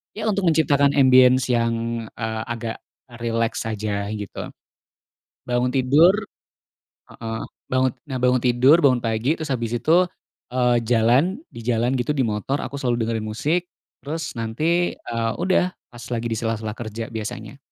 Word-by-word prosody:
ya 215 Hz, -, -5 dB
untuk 195 Hz, -2 st, 0 dB
menciptakan 145 Hz, -3 st, +3 dB
ambience 130 Hz, -1 st, +5 dB
yang, 115 Hz, -1 st, -1 dB
eee, 110 Hz, -1 st, -4 dB
agak 115 Hz, -1 st, -4 dB, 0.4 s
rileks 115 Hz, -1 st, -1 dB
saja 105 Hz, -2 st, -2 dB
gitu. 105 Hz, -3 st, -6 dB, 1.0 s
Bangun 125 Hz, 0 st, 0 dB
tidur 135 Hz, +6 st, +5 dB, 1.0 s
heeh, 115 Hz, -1 st, -6 dB, 0.2 s
bangun 130 Hz, 0 st, +2 dB, 0.2 s
nah 130 Hz, -4 st, -4 dB
bangun 125 Hz, 0 st, +4 dB
tidur, 125 Hz, +5 st, +5 dB
bangun 130 Hz, -7 st, +3 dB
pagi, 115 Hz, +5 st, 0 dB
terus 160 Hz, -2 st, -6 dB
habis 120 Hz, -3 st, -2 dB
itu, 165 Hz, +9 st, +3 dB, 0.5 s
eee, 125 Hz, -1 st, +3 dB
jalan, 125 Hz, -, +2 dB
di 115 Hz, -1 st, -10 dB
jalan 120 Hz, +2 st, +1 dB
gitu 125 Hz, +4 st, 0 dB
di 140 Hz, -, 0 dB
motor 115 Hz, +4 st, -1 dB
aku 140 Hz, +3 st, -5 dB
selalu 125 Hz, -3 st, 0 dB
dengerin 110 Hz, -1 st, -1 dB
musik, 150 Hz, +12 st, -1 dB, 0.3 s
terus 155 Hz, -3 st, -5 dB
nanti, 155 Hz, +11 st, 0 dB
eee, 115 Hz, -1 st, -3 dB
udah 185 Hz, -1 st, +2 dB, 0.2 s
pas 120 Hz, -2 st, -12 dB
lagi 120 Hz, 0 st, -2 dB
di 115 Hz, -, -2 dB
sela-sela 110 Hz, -1 st, -3 dB
kerja 115 Hz, 0 st, -6 dB
biasanya. 110 Hz, +1 st, -6 dB
120 Hz, 145 wpm, -22 LUFS, 115-140 Hz, 1.0 s, ambience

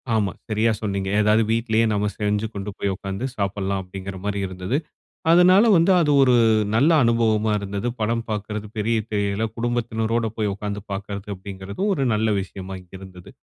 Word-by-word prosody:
ஆமா. 105 Hz, -3 st, +1 dB, 0.2 s
சரியா 110 Hz, +1 st, +2 dB
சொன்னீங்க. 100 Hz, -2 st, -2 dB
ஏதாது 105 Hz, +1 st, +4 dB
வீட்லேயே 115 Hz, 0 st, +2 dB
நம்ம 105 Hz, 0 st, 0 dB
செஞ்சு 105 Hz, 0 st, 0 dB
கொண்டு 100 Hz, 0 st, -5 dB
போய் 100 Hz, -1 st, -1 dB
உட்கார்ந்து 100 Hz, +4 st, -5 dB
சாப்பிடலாம், 100 Hz, -1 st, -1 dB
அப்படிங்கிற 95 Hz, +1 st, -7 dB
மாரி 100 Hz, 0 st, -2 dB
இருந்தது. 95 Hz, +7 st, -2 dB, 0.5 s
அதனால 180 Hz, +4 st, +6 dB
வந்து 170 Hz, +1 st, +4 dB
அது 160 Hz, -4 st, +2 dB
ஒரு 125 Hz, -2 st, +5 dB, 0.4 s
நல்ல 135 Hz, +9 st, +4 dB
அனுபவமா 110 Hz, -2 st, +2 dB
இருந்தது. 100 Hz, +3 st, -3 dB
படம் 115 Hz, +2 st, 0 dB
பாக்குறது 105 Hz, 0 st, -4 dB
பெரிய 110 Hz, +2 st, +1 dB
திரையில 100 Hz, 0 st, -1 dB
குடும்பத்தினரோடு 115 Hz, -1 st, -1 dB
போய் 105 Hz, -2 st, 0 dB
உட்கார்ந்து 105 Hz, 0 st, -5 dB
பாக்கிறது 100 Hz, 0 st, -5 dB
அப்படிங்கிறது 95 Hz, -, -8 dB
ஒரு 140 Hz, -7 st, 0 dB
நல்ல 110 Hz, 0 st, +1 dB
விஷயமா 95 Hz, 0 st, -7 dB, 0.2 s
இருந்து. 95 Hz, -2 st, -12 dB
105 Hz, 150 wpm, -23 LUFS, 100-115 Hz, 0.5 s, அதனால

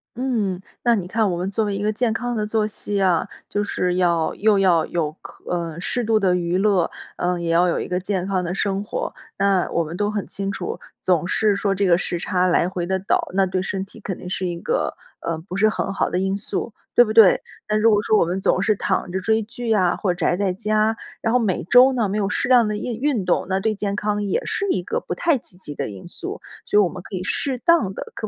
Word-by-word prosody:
嗯， 220 Hz, -7 st, -1 dB, 0.2 s
那 240 Hz, -1 st, +4 dB
你 190 Hz, -5 st, -1 dB
看， 215 Hz, 0 st, +1 dB
我 -, -, -1 dB
们 185 Hz, +2 st, -2 dB
作 220 Hz, +2 st, 0 dB
为 205 Hz, -1 st, -2 dB
一 200 Hz, -, -3 dB
个 210 Hz, +1 st, +1 dB
健 225 Hz, +1 st, 0 dB
康 245 Hz, +1 st, -2 dB
的 215 Hz, -, -1 dB
作 215 Hz, 0 st, 0 dB
息 205 Hz, -1 st, -3 dB
啊， 180 Hz, -4 st, +2 dB, 0.2 s
就 205 Hz, -, 0 dB
是 180 Hz, -3 st, -1 dB
要， 170 Hz, -3 st, +1 dB
又 210 Hz, -2 st, +3 dB
要 175 Hz, -4 st, +4 dB
有， 160 Hz, -3 st, -1 dB
可 -, -, -13 dB
嗯， 170 Hz, -1 st, -3 dB
适 245 Hz, +4 st, 0 dB
度 220 Hz, 0 st, +2 dB
的 185 Hz, -3 st, +2 dB
娱 175 Hz, 0 st, -1 dB
乐， 195 Hz, -4 st, +2 dB, 0.2 s
嗯， 180 Hz, -1 st, -1 dB
也 170 Hz, -, -2 dB
要 175 Hz, +2 st, +4 dB
有 170 Hz, -, 0 dB
一 -, -, -4 dB
个 180 Hz, 0 st, -1 dB
健 190 Hz, -1 st, -2 dB
康 190 Hz, -2 st, 0 dB
的 175 Hz, +1 st, -3 dB
生 195 Hz, 0 st, -1 dB
活。 -, -, -3 dB, 0.3 s
那 195 Hz, -2 st, +2 dB
我 170 Hz, -, +1 dB
们 165 Hz, +3 st, -6 dB
都 205 Hz, 0 st, 0 dB
很 205 Hz, -2 st, -3 dB
清 195 Hz, 0 st, -3 dB
楚， -, -, -5 dB, 0.2 s
总 175 Hz, -2 st, +1 dB
是 210 Hz, +1 st, +2 dB
说 200 Hz, 0 st, 0 dB
这 195 Hz, 0 st, +1 dB
个 170 Hz, -1 st, +5 dB
时 175 Hz, -, -3 dB
差 180 Hz, +1 st, +1 dB
来 175 Hz, 0 st, +2 dB
回 180 Hz, -2 st, -3 dB
地 190 Hz, +1 st, -1 dB
倒， 200 Hz, -, 0 dB
那 190 Hz, 0 st, +3 dB
对 185 Hz, 0 st, -1 dB
身 195 Hz, 0 st, -3 dB
体 210 Hz, -, -15 dB
肯 190 Hz, -3 st, -5 dB
定 180 Hz, -, -7 dB
是 185 Hz, -, -2 dB
一 170 Hz, -1 st, -4 dB
个， -, -, -1 dB, 0.3 s
呃， 165 Hz, -1 st, -3 dB
不 180 Hz, +3 st, -7 dB
是 215 Hz, +2 st, +4 dB
很 195 Hz, -2 st, -1 dB
好 -, -, 0 dB
的 180 Hz, -, 0 dB
因 195 Hz, +1 st, 0 dB
素， 210 Hz, +2 st, -2 dB, 0.2 s
对 240 Hz, -, +8 dB
不 215 Hz, -, -3 dB
对？ 220 Hz, -4 st, +7 dB, 0.3 s
那 215 Hz, -, 0 dB
如 215 Hz, +1 st, +4 dB
果 210 Hz, -2 st, +4 dB
说 215 Hz, -, +3 dB
我 -, -, +5 dB
们 180 Hz, +3 st, -2 dB
总 190 Hz, -, +2 dB
是 215 Hz, +1 st, +2 dB
躺 185 Hz, -2 st, -1 dB
着 190 Hz, -, -1 dB
追 220 Hz, +4 st, +1 dB
剧 235 Hz, +2 st, -7 dB
呀， 190 Hz, -5 st, +3 dB
或 185 Hz, -3 st, 0 dB
者 175 Hz, -1 st, -5 dB
宅 175 Hz, -, +3 dB
在 195 Hz, -2 st, 0 dB
家， 215 Hz, +3 st, +1 dB, 0.3 s
然 225 Hz, -1 st, 0 dB
后 250 Hz, -, +4 dB
每 205 Hz, -7 st, 0 dB
周 250 Hz, +8 st, +6 dB
呢 230 Hz, -4 st, +1 dB
没 200 Hz, +2 st, -2 dB
有 200 Hz, -1 st, 0 dB
适 -, -, -1 dB
量 245 Hz, -4 st, +5 dB
的 210 Hz, -, -2 dB
印 230 Hz, +1 st, -4 dB
运 265 Hz, -9 st, 0 dB
动， 180 Hz, -, +1 dB
那 190 Hz, +1 st, +1 dB
对 215 Hz, +2 st, 0 dB
健 200 Hz, 0 st, -2 dB
康 210 Hz, 0 st, -1 dB
也 195 Hz, -, -1 dB
是 400 Hz, -, -1 dB
一 185 Hz, -, +1 dB
个 -, -, -2 dB
不 -, -, -4 dB
太 330 Hz, -5 st, +2 dB
积 180 Hz, -, -9 dB
极 150 Hz, -5 st, -7 dB
的 -, -, -3 dB
因 95 Hz, -2 st, -10 dB
素， -, -, -6 dB, 0.3 s
所 210 Hz, -, +3 dB
以 -, -, +6 dB
我 185 Hz, -, +2 dB
们 180 Hz, +1 st, -7 dB
可 -, -, -7 dB
以 180 Hz, -, -4 dB
适 260 Hz, +6 st, -1 dB
当 295 Hz, -, +3 dB
地 -, -, -4 dB
可 215 Hz, -, -4 dB
195 Hz, 285 characters per minute, -22 LUFS, 180-215 Hz, 0.3 s, 对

